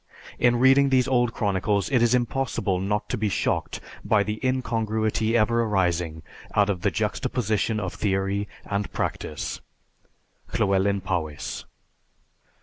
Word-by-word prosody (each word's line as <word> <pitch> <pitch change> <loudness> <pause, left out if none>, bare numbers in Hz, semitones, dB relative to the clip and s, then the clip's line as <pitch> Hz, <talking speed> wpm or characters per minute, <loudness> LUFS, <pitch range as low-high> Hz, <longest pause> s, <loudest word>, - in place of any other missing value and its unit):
In 120 0 +4
reading 135 +3 +5
these 130 -2 +3
old 120 -2 +2
chronicles 100 0 0
it 125 -3 +3
is 120 +1 +4
impossible 120 -6 0
not 105 +3 -1
to - - -2
be 105 -1 +1
shocked - - -1 0.2
by 105 -2 +3
the 105 +1 -4
incongruity 110 -3 0
ever 115 +2 +3
arising 90 -7 0 0.3
out 100 0 +4
of 90 -3 -4
the - - +2
juxtaposition 110 0 -1
of 95 -4 -3
theory 100 0 -1 0.2
and 100 -1 -2
practice_. - - -3 1.0
LLEWELYN 100 +1 +2
POWYS. 85 -6 -3
105 Hz, 130 wpm, -25 LUFS, 95-120 Hz, 1.0 s, reading